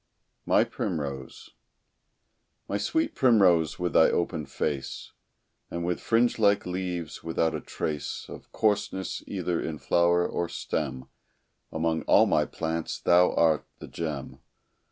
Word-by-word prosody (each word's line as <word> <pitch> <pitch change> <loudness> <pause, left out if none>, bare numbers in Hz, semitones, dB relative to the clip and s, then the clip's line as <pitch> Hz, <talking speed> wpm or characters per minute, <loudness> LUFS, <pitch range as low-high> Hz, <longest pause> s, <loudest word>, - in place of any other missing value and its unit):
MY - - +5
PRIMROSE 70 -5 -5 1.2
My 100 - -2
sweet 320 - 0
primrose 90 - +4
with 90 -2 -2
thy 80 - +6
open 75 -4 -1
face, 70 0 -4 0.6
And 85 0 -4
with 90 0 -1
fringe 115 +1 +2
like 100 -2 +3
leaves, 90 -3 -4
without 80 0 0
a - - -3
trace 75 -2 -4
Of - - -11
coarseness, 100 -3 -1
either 85 -2 -2
in 80 -1 -4
flower 85 +2 +2
or 85 -1 -2
stem, 65 0 -3 0.7
Among 80 0 0
all - - +6
my - - +2
plants 80 0 -3
thou 90 +1 +4
art 80 -2 +2
the - - -10
gem. 75 -5 -5
85 Hz, 130 wpm, -27 LUFS, 80-90 Hz, 1.2 s, thy